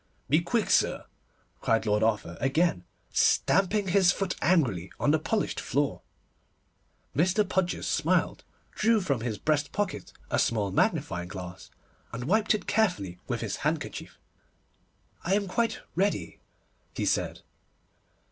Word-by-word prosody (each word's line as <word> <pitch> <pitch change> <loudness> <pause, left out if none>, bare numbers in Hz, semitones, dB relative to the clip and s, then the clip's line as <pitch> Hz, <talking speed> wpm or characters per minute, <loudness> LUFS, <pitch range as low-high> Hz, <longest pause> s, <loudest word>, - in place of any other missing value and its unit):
'Be 155 +3 +5
quick, 225 +6 0
sir,' - - +2 0.5
cried 115 0 +1
Lord 105 0 +2
Arthur 105 -6 0
again, 135 - +1 0.3
stamping 195 +1 +3
his 185 -1 +5
foot 195 -1 -2
angrily 130 - +2
on 145 - +3
the 155 - +3
polished 210 +6 -1
floor. 140 +2 -1 1.1
Mr. 185 - +2
Podgers 180 -1 -1
smiled, - - +1 0.3
drew 225 +1 +3
from 140 - -1
his 115 -3 -3
breast 150 +1 0
pocket 205 -2 -3 0.2
a - - +2
small 105 -4 +1
magnifying 90 -1 0
glass, 90 -1 -8 0.4
and 115 +2 -5
wiped 215 - +2
it 215 - -5
carefully 175 - 0
with - - -2
his - - -3
handkerchief. - - -3 1.1
'I 190 +3 +2
am 200 -1 0
quite 230 +5 -1
ready,' 195 +4 -1 0.6
he - - -1
said. - - 0
160 Hz, 130 wpm, -28 LUFS, -, 1.1 s, Be